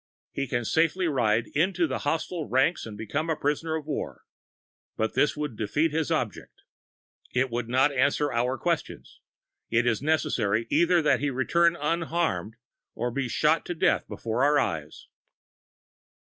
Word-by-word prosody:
He 140 - -3
can 120 -1 -2
safely 165 +6 +2
ride 120 -6 +1
into 175 +3 +2
the 135 -4 -3
hostile 160 +1 -2
ranks 135 +3 +1
and 105 -2 -8
become 140 +10 -3
a 160 - +1
prisoner 150 +3 -1
of 155 -2 -4
war. 150 - -5 0.7
But 110 - -1
this 150 - +2
would 150 -6 -3
defeat 145 +10 0
his 155 -3 -1
object. - - -3 0.7
It 130 0 +1
would 120 0 -3
not 130 +4 +3
answer 140 +2 +1
our 125 +3 0
question; 170 -3 -2 0.7
it 115 +1 +2
is 120 -2 +1
necessary 115 -8 +1
either 170 +2 +4
that 145 -5 +3
he 145 +2 0
return 170 +6 +2
unharmed 160 - -1 0.4
or 120 +1 -2
be 130 0 -2
shot 150 +6 +2
to 175 - -3
death - - +1
before 115 +3 -2
our 145 +1 +4
eyes. 80 - -2
145 Hz, 155 wpm, -27 LUFS, 120-160 Hz, 0.7 s, either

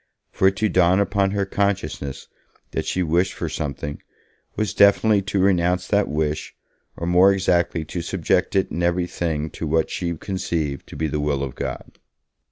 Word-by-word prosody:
For 95 - +3
it 95 - +2
to 110 +2 +1
dawn 90 -1 +3
upon 100 -1 +1
her 100 0 -1
consciousness 95 -9 -2 0.4
that - - -3
she 90 - 0
wished 90 +3 +1
for 85 - -4
something, 75 -2 -4 0.5
was 110 -2 -1
definitely 100 +1 +5
to 100 +1 -3
renounce 90 -1 +2
that 100 0 +2
wish, 75 0 -2 0.4
or, 85 - -4
more 90 +3 +5
exactly, 85 -4 +1
to 85 +3 -4
subject - - 0
it 95 - +1
in 85 - -3
every 85 +1 +1
thing 80 -3 -3
to 80 - -5
what 80 +1 +1
she 85 -2 -3
conceived 85 -7 -3
to - - -10
be 80 - -2
the 75 0 -2
will 75 -2 0
of 65 -3 -4
God. - - -6
90 Hz, 175 wpm, -22 LUFS, 80-95 Hz, 0.5 s, definitely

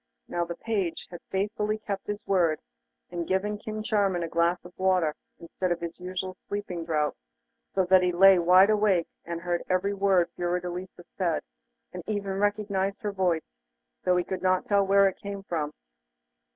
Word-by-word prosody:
Now 175 0 -1
the 170 0 -5
page 195 -5 -2
had 175 - -8
faithfully 210 +2 -1
kept 205 -2 -5
his 205 0 -4
word, 170 -5 +2 0.5
and 170 -1 -3
given 205 +2 0
King 215 0 -5
Charming 200 -6 +1
a - - -2
glass 170 +2 +1
of 180 - -11
water 185 -5 +2 0.3
instead 175 +2 -3
of 175 - 0
his 170 -1 -6
usual 185 +1 -4
sleeping 195 -4 -4
draught, 155 -2 0 0.6
so 190 -1 +3
there 185 +1 +6
he 180 0 +2
lay 190 +1 +7
wide 185 +4 +6
awake, 205 -5 +3 0.2
and 170 0 -4
heard 175 -1 -1
every 185 +2 +1
word 190 -3 +2
Fiordelisa 180 +1 -3
said, 170 -4 -1 0.5
and 180 - -5
even 200 -2 -2
recognised 205 0 0
her 210 - -1
voice, 180 -5 0 0.6
though 180 0 +3
he 180 - +2
could 190 +1 -4
not 185 0 +2
tell 200 -1 +3
where 200 0 +6
it 190 - -2
came 200 -1 -6
from. 155 -5 -2
185 Hz, 175 wpm, -27 LUFS, 175-200 Hz, 0.6 s, lay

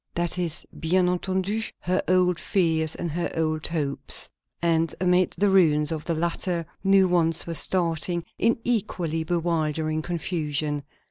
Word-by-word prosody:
That 175 +1 0
is, 170 -2 -2
bien 180 +3 +2
entendu, 190 +4 -1 0.2
her 185 +1 +1
old 180 -1 +3
fears 160 -4 +1
and 170 - -3
her 175 +2 -2
old 155 -1 0
hopes; 145 -4 -1 0.3
and 165 -1 +1
amid 180 0 +2
the 205 - +3
ruins 150 -5 +4
of 155 -2 -4
the 165 - -1
latter 170 +1 -1 0.2
new 195 -1 +5
ones 170 -2 +2
were 170 - -4
starting, 170 0 0
in 230 - +3
equally 175 -8 -1
bewildering 160 -2 -1
confusion. 155 -4 -2
170 Hz, 140 wpm, -25 LUFS, 160-180 Hz, 0.3 s, new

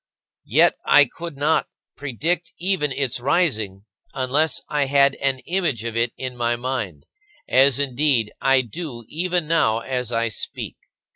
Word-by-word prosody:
Yet - - +4
I 145 - +6
could 165 +2 -8
not 150 +3 +1 0.3
predict 165 +6 -2
even 175 -5 0
its 130 -3 -1
rising, 110 - 0 0.3
unless 140 +4 +1
I 145 -1 0
had 140 0 +4
an 135 -1 -1
image 170 - -1
of 115 -1 -4
it 115 0 +1
in 130 -1 -5
my 120 0 0
mind; 120 - -4 0.4
as, 135 0 +4
indeed, 130 -4 +1
I 135 -1 +4
do 120 - -7
even 175 0 -1
now 115 -9 +2
as 125 -1 -3
I 115 0 0
speak. 105 - -6
135 Hz, 145 wpm, -22 LUFS, 120-155 Hz, 0.4 s, I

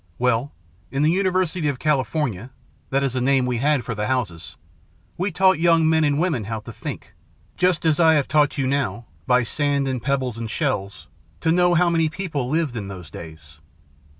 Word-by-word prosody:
"Well, 125 +3 +1 0.4
in 135 +2 -1
the 155 - +4
University 185 -3 0
of 140 -3 -1
California 130 - -1 0.4
that 135 +1 +1
is 135 -3 -1
the 130 - -1
name 135 0 +2
we 125 -1 -1
had 140 -2 +1
for 120 - -3
the 105 -1 -2
houses 105 -11 -3 0.6
we 190 +3 -2
taught 190 0 +3
young 165 -1 +4
men 160 0 +3
and 145 -1 +2
women 160 - 0
how 110 +1 -4
to - - -10
think, - - -7 0.4
just 180 -3 +1
as 155 -1 +2
I 160 -1 +6
have 140 -3 +1
taught 150 +1 +2
you 135 - 0
now, 135 -3 -1 0.2
by 125 -1 +4
sand 140 +2 0
and 130 -2 -2
pebbles 130 -2 -1
and 115 -1 -4
shells, 110 -8 -3 0.3
to 160 - +2
know 175 0 +3
how 175 +1 +4
many 165 -2 +2
people 155 -8 -4
lived 155 -4 0
in 105 -4 -4
those 90 -5 -9
days. 80 -2 -11
140 Hz, 195 wpm, -22 LUFS, 120-160 Hz, 0.6 s, I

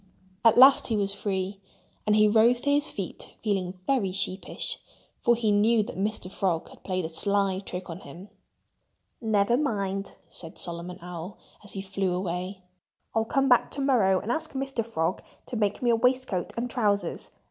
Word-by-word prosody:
At 230 -1 +6
last 265 +2 +8
he 225 - 0
was 200 -1 0
free. 195 -1 -3 0.5
And 210 - +4
he 215 0 +6
rose 230 +3 +5
to 285 - +1
his 290 +1 +2
feet 195 -4 -7
feeling 190 -4 -1
very 245 -9 +1
sheepish, 190 0 -2 0.4
for 240 - +4
he 225 -2 +1
knew 215 +2 +4
that 230 - -7
Mr. 195 -1 -2
Frog 180 -5 -1
had - - -17
played 185 -2 -2
a - - -1
sly 195 +2 +2
trick 185 -2 -7
on 165 +1 -7
him. 175 +6 -11 0.9
"Nevermind!" 205 -3 0
said 165 -2 -6
Solomon 175 +1 -5
Owl, 180 +2 -7 0.3
as 205 - -7
he 195 - -4
flew 190 -2 -1
way. 185 +1 -4 0.5
"I'll 225 0 +1
come 275 +4 +1
back 245 -2 +4
to 280 - -4
morrow 220 -9 +3
and 230 - -3
ask 315 +4 -2
Mr. 270 -3 -2
Frog 180 -6 -1 0.2
to - - -6
make 210 +1 0
me 240 - +4
a - - +5
waistcoat 250 -6 +1
and 240 +1 -1
trousers. 205 -7 -1
200 Hz, 175 wpm, -27 LUFS, 185-235 Hz, 0.9 s, last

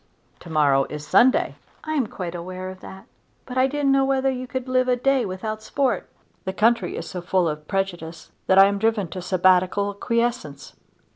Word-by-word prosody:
"To 175 - -12
morrow 145 -3 +3
is 150 0 -7
Sunday." 250 +11 +3 0.3
"I 310 - -3
am 275 -7 0
quite 180 -4 -6
aware 185 +2 -6
of 185 - -12
that, 190 +1 -11 0.4
but 250 - -8
I 260 +1 +3
didn't 285 0 0
know 270 0 +4
whether 270 0 +1
you 255 0 -5
could 260 0 -5
live 255 0 +1
a 250 - +3
day 260 -2 +1
without 215 +4 -5
sport." 270 +4 -1 0.3
"The 190 - -4
country 230 +3 +2
is - - -6
so 180 - -6
full 180 0 +1
of 150 -1 -5
prejudice 175 -4 -4 0.2
that 190 - +4
I 195 - +9
am 200 0 0
driven 220 -4 0
to 185 - -6
Sabbatical 185 +2 +2
quiescence." 230 - -2
200 Hz, 195 wpm, -23 LUFS, 180-255 Hz, 0.4 s, I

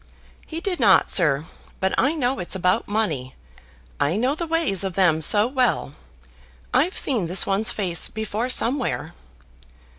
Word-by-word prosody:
"He 325 - -4
did 370 -3 -3
not, 205 -6 +4
sir; 150 -4 +3 0.3
but 190 0 0
I 285 +5 +1
know 265 -3 -1
it's 180 +1 -2
about 185 +4 0
money. 160 -12 -2 0.6
I 145 +5 +1
know 250 +6 0
the 335 +2 -5
ways 320 - +1
of 190 -3 -4
them 170 -5 +2
so 205 +7 +4
well. 250 - -1 0.8
I've 320 +9 +1
seen 230 -11 +1
this 180 +3 +2
one's 200 +3 +1
face 180 -5 0
before 220 +3 -4
somewhere." 255 +1 -2
210 Hz, 150 wpm, -22 LUFS, 180-260 Hz, 0.8 s, not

